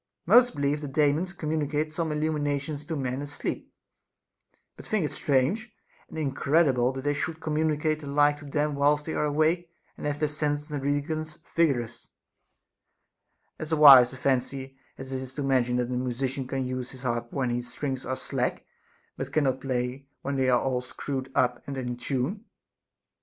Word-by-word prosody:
Most 245 Hz, +6 st, +6 dB
believe 145 Hz, +1 st, 0 dB
that 145 Hz, -2 st, -6 dB
Daemons 150 Hz, +5 st, +2 dB
communicate 155 Hz, -2 st, -2 dB
some 165 Hz, 0 st, -1 dB
illumina 150 Hz, -2 st, 0 dB
tions 145 Hz, +1 st, -7 dB
to 160 Hz, -, -2 dB
men 130 Hz, -1 st, -2 dB
asleep, 145 Hz, 0 st, -5 dB, 1.0 s
but -, -, -11 dB
think 210 Hz, -7 st, 0 dB
it 145 Hz, -, -3 dB
strange 145 Hz, -, 0 dB, 0.4 s
and -, -, -9 dB
incredible 140 Hz, -3 st, +2 dB
that 135 Hz, 0 st, -6 dB
they 145 Hz, 0 st, +1 dB
should 160 Hz, +2 st, -3 dB
communicate 155 Hz, 0 st, 0 dB
the 150 Hz, -, -9 dB
like 145 Hz, +1 st, +3 dB
to 145 Hz, -, -12 dB
them 150 Hz, +1 st, 0 dB
whilst 145 Hz, +1 st, +2 dB
they 160 Hz, -, -3 dB
are -, -, 0 dB
awake 160 Hz, +4 st, +1 dB, 0.3 s
and -, -, -5 dB
have 145 Hz, 0 st, -1 dB
their 150 Hz, 0 st, +1 dB
senses 150 Hz, 0 st, -2 dB
and 145 Hz, -2 st, -2 dB
reason 145 Hz, +3 st, -1 dB, 0.3 s
vigorous; 125 Hz, -8 st, +1 dB, 1.5 s
as 155 Hz, +1 st, -5 dB
wise 135 Hz, -5 st, +9 dB
a 130 Hz, -, -9 dB
fancy 135 Hz, 0 st, -1 dB, 0.2 s
as 135 Hz, 0 st, -7 dB
it 130 Hz, -, -2 dB
is 130 Hz, 0 st, -8 dB
to 145 Hz, -, -2 dB
imagine 130 Hz, -3 st, +2 dB
that 125 Hz, -1 st, 0 dB
a -, -, -1 dB
musician 130 Hz, +1 st, -2 dB
can 135 Hz, 0 st, -2 dB
use 125 Hz, 0 st, -4 dB
his 130 Hz, -1 st, -11 dB
harp 120 Hz, -1 st, -2 dB
when 130 Hz, -3 st, -1 dB
the 120 Hz, 0 st, -1 dB
strings 130 Hz, +1 st, -4 dB
are 130 Hz, -, -2 dB
slack, -, -, -2 dB, 0.5 s
but 135 Hz, 0 st, -4 dB
cannot 135 Hz, -3 st, +1 dB
play 130 Hz, +1 st, -2 dB, 0.2 s
when 140 Hz, 0 st, -2 dB
they 130 Hz, -1 st, +2 dB
are 125 Hz, 0 st, +2 dB
screwed 130 Hz, +1 st, -5 dB
up 125 Hz, -1 st, +2 dB
and 140 Hz, -1 st, -4 dB
in 125 Hz, -2 st, -3 dB
tune. 140 Hz, -, -2 dB
140 Hz, 175 wpm, -27 LUFS, 130-150 Hz, 1.5 s, wise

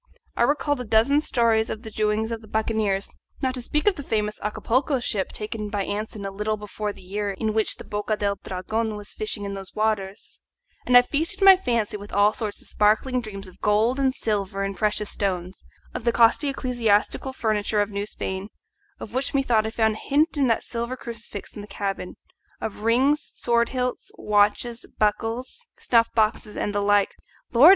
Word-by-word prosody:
I -, -, -1 dB
recalled 290 Hz, -2 st, +2 dB
a -, -, -3 dB
dozen 230 Hz, +6 st, +3 dB
stories 230 Hz, -5 st, +2 dB
of 220 Hz, -, -5 dB
the 220 Hz, -, -8 dB
doings 215 Hz, +1 st, 0 dB
of 225 Hz, -1 st, -4 dB
the 220 Hz, -, -14 dB
buccaneers, 215 Hz, -2 st, 0 dB, 0.3 s
not 260 Hz, -2 st, 0 dB
to 255 Hz, -, -3 dB
speak 300 Hz, +5 st, -1 dB
of 405 Hz, -, +4 dB
the -, -, -4 dB
famous 210 Hz, -5 st, -1 dB
Acapulco 255 Hz, +6 st, 0 dB
ship 210 Hz, -5 st, -2 dB
taken 210 Hz, 0 st, -4 dB
by 205 Hz, -1 st, -1 dB
Anson 210 Hz, 0 st, -4 dB
a 195 Hz, -, -3 dB
little 210 Hz, +2 st, -2 dB
before 210 Hz, 0 st, -4 dB
the 195 Hz, -, -14 dB
year 205 Hz, +2 st, -3 dB
in 215 Hz, +3 st, -2 dB
which 220 Hz, -1 st, +1 dB
the -, -, -10 dB
Boca 210 Hz, +1 st, -2 dB
del 200 Hz, -1 st, -1 dB
Dragon 220 Hz, +4 st, -2 dB
was 205 Hz, 0 st, -7 dB
fishing 215 Hz, -1 st, -3 dB
in 200 Hz, -, -4 dB
those 195 Hz, -1 st, -8 dB
waters; 210 Hz, -2 st, -2 dB, 0.5 s
and 245 Hz, -, +8 dB
I 245 Hz, -, +8 dB
feasted 315 Hz, +9 st, -1 dB
my 390 Hz, -1 st, +10 dB
fancy 235 Hz, -, -1 dB
with 205 Hz, 0 st, -10 dB
all 205 Hz, +1 st, +4 dB
sorts 215 Hz, -2 st, -3 dB
of -, -, -7 dB
sparkling 220 Hz, +5 st, +2 dB
dreams 200 Hz, -3 st, -8 dB
of 185 Hz, -, -15 dB
gold 220 Hz, +5 st, +2 dB
and 265 Hz, -1 st, +3 dB
silver 200 Hz, -5 st, -2 dB
and 195 Hz, 0 st, -3 dB
precious 210 Hz, 0 st, 0 dB
stones, 185 Hz, -2 st, -3 dB, 0.3 s
of -, -, -5 dB
the 235 Hz, -, +3 dB
costly 235 Hz, +5 st, +4 dB
ecclesiastical 240 Hz, -1 st, +1 dB
furniture 215 Hz, -4 st, 0 dB
of 205 Hz, 0 st, +1 dB
New 200 Hz, +1 st, -3 dB
Spain, 190 Hz, -1 st, -4 dB, 0.5 s
of 215 Hz, -, -8 dB
which 265 Hz, +2 st, -1 dB
methought 235 Hz, -5 st, +2 dB
I -, -, -1 dB
found 220 Hz, -1 st, +2 dB
a -, -, -7 dB
hint 300 Hz, +4 st, +2 dB
in 280 Hz, -3 st, +2 dB
that 230 Hz, -, +2 dB
silver 235 Hz, +2 st, -4 dB
crucifix 230 Hz, -4 st, -8 dB
in 210 Hz, -, -6 dB
the 205 Hz, -, -10 dB
cabin, 195 Hz, -2 st, -4 dB, 0.4 s
of 215 Hz, -, -5 dB
rings, 265 Hz, +6 st, +3 dB
sword 235 Hz, -1 st, 0 dB
hilts, 250 Hz, -1 st, -2 dB
watches, 210 Hz, +3 st, +1 dB
buckles, 230 Hz, -, -1 dB
snuff 235 Hz, -, +3 dB
boxes, 215 Hz, -1 st, +1 dB
and 205 Hz, -, -1 dB
the 205 Hz, -, +1 dB
like. 205 Hz, 0 st, +3 dB, 0.4 s
Lord! 260 Hz, +8 st, +9 dB
220 Hz, 195 wpm, -24 LUFS, 205-240 Hz, 0.5 s, my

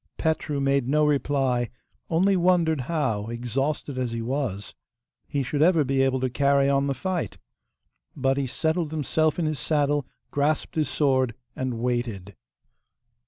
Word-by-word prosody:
Petru 160 Hz, -3 st, -1 dB
made 140 Hz, -2 st, +1 dB
no 150 Hz, +2 st, +3 dB
reply, 135 Hz, -4 st, +1 dB, 0.4 s
only 190 Hz, +4 st, +3 dB
wondered 170 Hz, -4 st, +3 dB
how, 115 Hz, -11 st, 0 dB
exhausted 130 Hz, +4 st, -2 dB
as 125 Hz, -2 st, -1 dB
he 115 Hz, -, -2 dB
was, 120 Hz, -6 st, -3 dB, 0.5 s
he 140 Hz, -1 st, -1 dB
should 145 Hz, +3 st, -2 dB
ever 165 Hz, -1 st, +5 dB
be 135 Hz, 0 st, +1 dB
able 135 Hz, -1 st, +2 dB
to 130 Hz, -, +2 dB
carry 140 Hz, +2 st, +2 dB
on 140 Hz, 0 st, +2 dB
the 140 Hz, -, -1 dB
fight. 185 Hz, +5 st, -3 dB, 0.8 s
But 135 Hz, -1 st, +1 dB
he 140 Hz, -1 st, 0 dB
settled 160 Hz, +5 st, -1 dB
himself 155 Hz, 0 st, 0 dB
in 170 Hz, -, 0 dB
his 155 Hz, -2 st, -1 dB
saddle, 145 Hz, -3 st, +1 dB, 0.2 s
grasped 145 Hz, +2 st, 0 dB
his 155 Hz, -5 st, 0 dB
sword, 130 Hz, -5 st, +1 dB, 0.2 s
and 130 Hz, -2 st, -2 dB
waited. 115 Hz, -5 st, -2 dB
140 Hz, 150 wpm, -25 LUFS, 130-155 Hz, 0.8 s, ever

